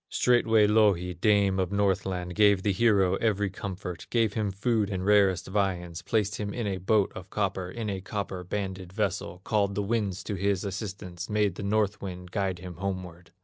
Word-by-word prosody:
Straightway 115 -3 +4
Louhi, 105 -4 +3
dame 100 +1 +2
of 95 0 0
Northland, 95 -3 0
Gave 100 -1 +4
the 105 - +2
hero 95 -2 +3
every 105 -3 0
comfort, 95 -3 -6
Gave 115 -4 +2
him 105 -3 -1
food 105 +1 0
and 95 -2 -3
rarest 100 -3 +4
viands, 90 -4 -1
Placed 105 -2 0
him 100 -1 -4
in 120 - -2
a 100 -2 -1
boat 100 +2 +2
of 95 -1 -9
copper, 95 -3 -2
In 115 +3 -5
a 95 -2 -3
copper 95 -2 -4
banded 95 -1 -4
vessel, 95 -3 -2
Called 100 -2 +1
the 105 - 0
winds 100 -3 -1
to 105 - -4
his 100 0 0
assistance, 95 -2 -5
Made 105 -2 +1
the 95 - -7
North 105 0 0
wind 90 -2 -7
guide 95 -2 -1
him 90 -1 -9
homeward. 90 -3 -5
100 Hz, 185 wpm, -28 LUFS, 95-105 Hz, -, Straightway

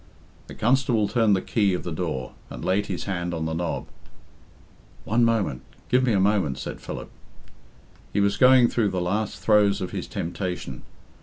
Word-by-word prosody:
The - - -10
constable 120 -2 +2
turned 110 -3 +3
the 95 - -2
key 100 -5 +1
of - - -5
the 85 - -4
door, 75 -7 -3 0.2
and - - -7
laid 100 +2 +1
his 95 -3 -4
hand 85 -3 -3
on 80 -1 -3
the 80 - -2
knob. 85 +1 -2 1.2
"One 115 +3 +2
moment 110 - +1 0.3
give 125 +1 +3
me 125 -3 +2
a 100 - +3
moment," 95 -8 +2
said - - -6
Philip. - - -7 1.0
He 100 - 0
was 100 0 +2
going 125 -1 +6
through 115 -3 +1
the 95 - -2
last 100 +4 -1
throes 105 -2 +3
of 95 -2 -4
his - - -4
temptation. 90 -7 -4
100 Hz, 175 wpm, -25 LUFS, 90-110 Hz, 1.2 s, going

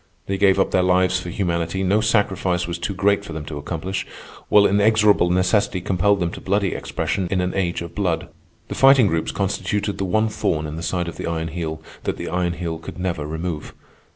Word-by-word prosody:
They 95 0 -2
gave 95 -2 +4
up - - +2
their 95 - +3
lives 90 0 +3
for 90 - -6
humanity, 85 0 -1
no 100 +3 +2
sacrifice 95 -5 +1
was 85 0 -4
too 90 +3 -3
great 100 +2 +2
for 85 - -8
them 75 -1 -5
to 75 -1 -6
accomplish, 90 +6 -3 0.5
while 105 -1 +6
inexorable 105 -2 +4
necessity 95 +2 +2
compelled 95 +3 +1
them 85 -2 -1
to - - -9
bloody 100 0 0
expression 80 +3 -2
in 95 - 0
an 90 0 -1
age 90 -3 -1
of 85 - -9
blood. 90 -5 -1 0.4
The - - -5
Fighting 135 -3 +6
Groups 80 -4 0
constituted 100 +1 -2
the 95 - 0
one 110 +4 +2
thorn 80 -7 -1
in 75 0 -5
the 80 - -5
side 85 +1 -2
of 85 - -7
the - - -4
Iron 80 -1 -2
Heel 80 -1 -5 0.2
that - - -1
the - - -5
Iron 90 -1 0
Heel 85 -2 -4
could 80 - -9
never 85 -5 -2
remove. 80 0 -5
90 Hz, 210 wpm, -22 LUFS, 85-100 Hz, 0.5 s, while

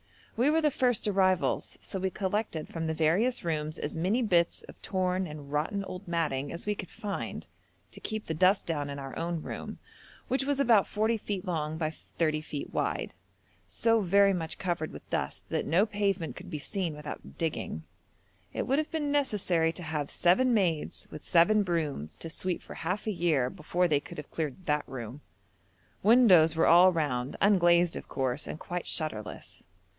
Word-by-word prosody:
We 250 +5 +3
were 320 +2 +3
the 300 -1 +3
first 250 -5 +1
arrivals, 190 -3 +1
so 190 - -5
we 190 +1 0
collected 190 -4 -2
from 165 -1 -4
the 160 - -1
various 180 +11 +2
rooms 155 -2 -2
as - - -4
many 190 +10 +1
bits 170 -5 +2
of - - -14
torn 185 -1 0
and 150 -2 -9
rotten 155 +7 -1
old 185 +1 -8
matting 150 -5 -1
as 170 - -5
we 210 - +1
could 195 - -7
find, 205 -2 -5 0.5
to - - -10
keep 215 -1 -4
the 160 - -2
dust 185 +5 +3
down 145 -4 -2
in 140 - -5
our 135 -1 -7
own 170 -1 -2
room, - - -6 0.5
which 260 +1 +1
was 280 0 0
about 230 -7 +5
40 220 +2 +1
feet 200 -3 -4
long 160 -3 -2
by 155 -1 -1
30 155 -1 -2
feet 150 -2 -6
wide, - - -1 0.5
so 230 -1 +2
very 200 +1 +4
much 165 -3 -3
covered 170 -4 -2
with - - -11
dust - - -2
that - - -1
no 185 +6 +4
pavement 200 -5 -1
could - - -10
be 155 - -3
seen 170 +1 -3
without 150 0 -8
digging. 155 - -3 0.7
It - - -2
would 270 +3 +2
have 310 - -2
been 295 -3 -1
necessary 190 - +2
to 175 - -7
have 150 -2 -3
'seven 220 +9 +3
maids 180 -9 0
with 155 - -8
seven 205 +5 +4
brooms 155 - -2
to 165 - -7
sweep 180 +2 -3
for - - -9
half 185 +5 -3
a 215 - 0
year' 160 -9 +1
before 180 +1 0
they 150 -4 +3
could - - -11
have 150 - -8
cleared 160 +3 -4
that 150 0 0
room. 130 +1 -7 0.8
Windows 190 -8 +6
were 165 - +3
all 180 +2 +7
round, 140 -6 -1
unglazed 175 -4 +4
of - - -7
course, 130 +1 -2
and 155 - -6
quite 175 0 -4
shutterless. 110 -10 -4
175 Hz, 185 wpm, -29 LUFS, 155-205 Hz, 0.8 s, all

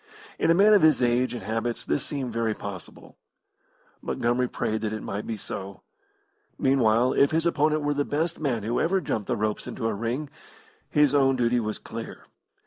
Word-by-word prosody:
In - - +2
a 165 - +6
man 205 +4 +6
of 205 - +6
his 155 -5 +4
age 125 +1 +1
and 120 - -6
habits 115 +3 -3
this 145 - 0
seemed 130 -5 -4
very 115 -2 0
possible. 95 -4 -9 0.8
Montgomery 120 +2 0
prayed 110 -3 -2
that 110 -1 -2
it 110 - -5
might 100 +2 -5
be 115 - -3
so. 95 -1 -7 0.7
Meanwhile, 125 -2 +3
if 140 - +4
his 160 +1 0
opponent 155 -2 +2
were 145 0 +1
the 145 0 0
best 160 +4 -2
man 125 -8 -1
who 115 +3 -1
ever 190 +3 +2
jumped 110 - -3
the - - -1
ropes 105 0 -2
into 115 - -5
a - - -1
ring, 120 +7 -3 0.6
his 150 -2 +3
own 135 -2 +4
duty 120 -1 +2
was 110 -2 -3
clear. 115 0 -8
125 Hz, 190 wpm, -26 LUFS, 110-145 Hz, 0.8 s, a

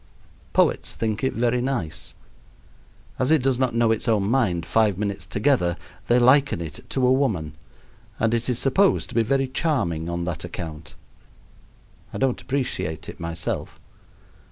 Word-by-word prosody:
Poets - - +2
think 110 0 -2
it 130 - +1
very 120 +1 +1
nice. 120 - -3 1.0
As 130 - +2
it 155 -5 +4
does 130 -2 +2
not 130 -3 +1
know 115 -1 +3
its 110 +2 0
own 110 -3 +3
mind 100 -7 +1
five 110 -4 +2
minutes 100 -3 -3
together, 100 - +1 0.3
they 120 - +4
liken 130 -1 +4
it 80 -3 -6
to 130 -2 +1
a 125 - +4
woman; 95 - 0 0.7
and 110 +1 +2
it 120 +2 -1
is 125 - +1
supposed 185 +11 +2
to - - -10
be 115 - +4
very 135 +4 +1
charming 115 - -1
on 85 0 -2
that 85 -2 -3
account. 80 -2 -7 1.2
I - - -5
don't 130 -2 0
appreciate 125 - -3
it, - - -10
myself. 85 -1 -4
115 Hz, 155 wpm, -24 LUFS, 85-130 Hz, 1.2 s, it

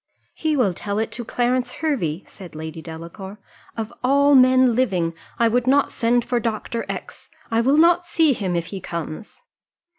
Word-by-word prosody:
"He 310 -2 -1
will 210 -8 +2
tell 200 +3 -4
it 220 +1 -1
to 240 - -5
Clarence 245 +2 0
Hervey," 245 - -2
said 180 -5 -12
Lady 160 +1 -7
Delacour: 170 +5 -9 0.4
"of 220 -1 -4
all 280 +2 +4
men 255 -1 +6
living, 185 -10 +1 0.2
I 230 - +3
would 245 +2 +1
not 280 +2 +3
send 240 0 +1
for 245 - 0
Dr. 230 0 -3
X; - - -7 0.2
I 225 0 +3
will 270 +5 +3
not 345 +2 +4
see 325 -4 +3
him 190 -6 -2
if 170 -1 -1
he 195 - -5
comes." 170 - -7
235 Hz, 175 wpm, -22 LUFS, 185-260 Hz, 0.4 s, men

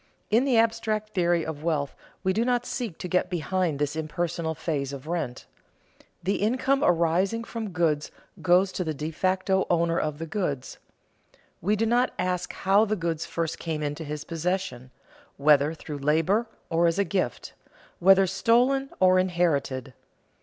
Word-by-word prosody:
In 235 +5 +4
the 260 -4 +3
abstract 225 -1 +1
theory 175 -3 +2
of 160 -2 -4
value 150 -2 0 0.4
we 190 - +2
do 225 - +1
not 245 0 +1
seek 235 -9 -4
to - - -5
get 180 0 +1
behind 175 -2 -1
this 145 +1 -1
impersonal 160 +1 -2
phase 140 -5 -2
of 140 0 -8
rent. 160 -7 -3 0.8
The 195 +3 +1
income 260 +6 +1
arising 180 +6 +2
from 230 -2 -5
goods 160 -4 0 0.3
goes 185 +2 +4
to 185 - -2
the 160 -3 -3
de 150 +3 -4
facto 190 +3 +1
owner 170 -1 +2
of 155 -1 -2
the 165 - -5
goods. 155 -7 -3 0.8
We 205 +5 +2
do 220 +2 +1
not 240 +3 +2
ask 180 -1 -1
how 200 +2 +3
the 215 0 0
goods 165 -4 -2
first 165 -1 -3
came 155 -2 -3
into 145 +2 -3
his 150 0 -5
possession, 165 -6 -3 0.5
whether 145 +2 +4
through 150 -2 -7
labor 165 +11 +2 0.2
or 170 +1 +3
as 165 +1 +1
a 200 - +3
gift, 185 - -2 0.5
whether 195 +1 +6
stolen 245 +8 +2
or 185 0 +5
inherited. 155 -8 0
175 Hz, 160 wpm, -26 LUFS, 155-195 Hz, 0.8 s, whether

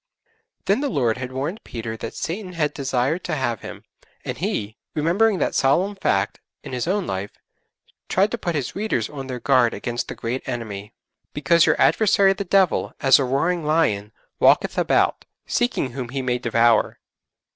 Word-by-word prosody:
Then 200 +7 +2
the 290 - 0
Lord 125 -7 +1
had 125 0 -5
warned 145 - -4
Peter 115 -1 -6
that 115 - -7
Satan 185 +2 -4
had 155 -4 0
desired 135 +4 -1
to - - -1
have 120 -6 -2
him, - - -9 0.4
and - - -3
he 105 +1 -2 0.2
remembering 190 +7 +2
that - - 0
solemn 180 +10 +2
fact 100 - 0 0.2
in - - -8
his 125 +2 -2
own 195 +1 0
life 95 - -4 0.8
tried 200 +3 +2
to 235 - -2
put 175 -4 -2
his 140 -5 -3
readers 200 - -1
on 135 -3 -7
their 125 -2 -5
guard 125 -3 +3
against 120 0 -3
the - - -6
great 120 +3 -3
enemy, 105 -3 -5 0.4
'_because 155 +3 +4
your - - +2
adversary 200 -2 +4
the 200 - -4
Devil, 190 -2 +2
as 135 -1 +6
a - - +2
roaring 160 +7 0
lion, 150 -10 +1 0.3
walketh - - +4
about, - - +2 0.2
seeking 240 - 0
whom 125 -1 -5
he 135 +1 -3
may 125 -1 0
devour. 115 -1 +2
135 Hz, 175 wpm, -22 LUFS, 120-180 Hz, 0.8 s, as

